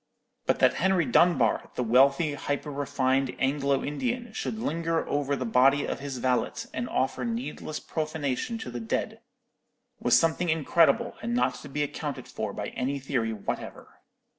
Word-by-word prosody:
But - - +3
that - - +4
Henry 190 -3 +3
Dunbar, 170 +8 +3
the 125 - 0
wealthy, 135 +6 +4
hyper 145 +1 -3
refined 135 -2 0
Anglo 140 0 +1
Indian, 240 - -3
should 220 - -3
linger 165 -4 -1
over 145 -1 0
the 130 - -3
body 135 +5 +4
of - - -3
his 135 -2 -5
valet 125 0 +1 0.2
and 240 - -3
offer 130 -1 0
needless 125 +6 -4
profanation 155 - -2
to 125 - -7
the 120 - -4
dead, 115 - -3 0.8
was - - +5
something 165 +2 +1
incredible, 160 - +3
and 235 +1 -2
not 245 - +2
to 145 - -10
be 150 +2 -1
accounted 145 -3 -5
for 110 -2 -4
by 105 +1 -4
any 135 +3 -2
theory 130 -4 -1
whatever. 105 -2 -6
140 Hz, 160 wpm, -27 LUFS, 130-160 Hz, 0.8 s, was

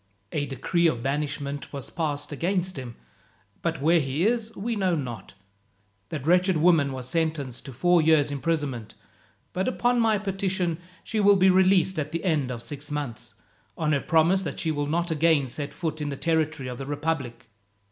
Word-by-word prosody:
"A 145 -1 -1
decree 170 +5 +1
of 120 -7 -1
banishment 140 0 -3
was 140 -3 -7
passed 150 -4 -2
against 180 +4 -1
him, 125 -4 -7 0.7
but 165 -4 -2
where 165 +2 +5
he 140 +4 0
is 230 0 +1
we 230 +4 -2
know 190 -4 +1
not. 120 -10 -6 0.7
That 145 -4 -5
wretched 180 +1 +4
woman 155 -4 +4
was 130 -2 -5
sentenced 155 -5 -2
to 135 - -7
four 175 +7 +3
years' 155 -2 +4
imprisonment, 140 -6 -2 0.6
but 185 +1 -1
upon 245 -1 +2
my 225 -2 +3
petition 190 -4 -1 0.2
she 220 - -2
will 205 -1 +6
be 190 0 +5
released 185 -1 +4
at 150 -1 -2
the 165 +1 -4
end 155 -8 +1
of 120 -2 -5
six 145 0 -7
months, 145 -5 -5 0.4
on 155 -2 0
her 140 -2 +2
promise 165 +4 +3
that 170 - -5
she 160 - 0
will 145 -1 -1
not 170 +3 0
again 160 -2 +3
set 140 +3 -5
foot 155 0 -4
in 145 - -2
the 140 - -4
territory 155 -4 0
of 125 -1 -6
the 135 - -5
republic. 145 -5 -3
155 Hz, 180 wpm, -26 LUFS, 140-180 Hz, 0.7 s, will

